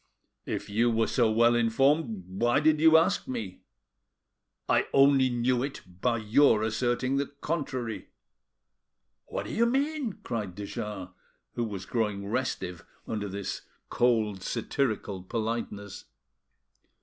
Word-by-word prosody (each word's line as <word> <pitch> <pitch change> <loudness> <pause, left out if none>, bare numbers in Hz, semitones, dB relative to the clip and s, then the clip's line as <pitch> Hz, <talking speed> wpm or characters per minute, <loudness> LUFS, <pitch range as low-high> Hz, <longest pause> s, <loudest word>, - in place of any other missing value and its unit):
"If - - -3
you 115 +4 +2
were 115 -1 +2
so 120 -4 +2
well 115 +2 +4
informed 120 - +2
why 120 +8 +1
did 155 0 +3
you 160 0 +7
ask 165 - +2
me?" 110 -7 -5 1.1
"I - - +2
only 135 -1 +5
knew 120 0 +1
it 140 +1 -4 0.2
by 120 -2 +2
your 110 +1 +4
asserting 120 +4 0
the 140 0 0
contrary." 140 -6 -4 1.2
"What - - -4
do - - -6
you 235 +1 +3
mean?" 275 -2 0
cried 105 -7 -4
de 100 0 -5
Jars, 100 -3 -5 0.4
who 120 - -2
was 100 -4 -6
growing 105 -2 -1
restive 100 -6 -3 0.2
under 105 -2 -3
this 100 +1 -4 0.3
cold, 110 -5 +1
satirical 110 -4 -2
politeness. 110 -1 -4
120 Hz, 125 wpm, -28 LUFS, 105-135 Hz, 1.2 s, you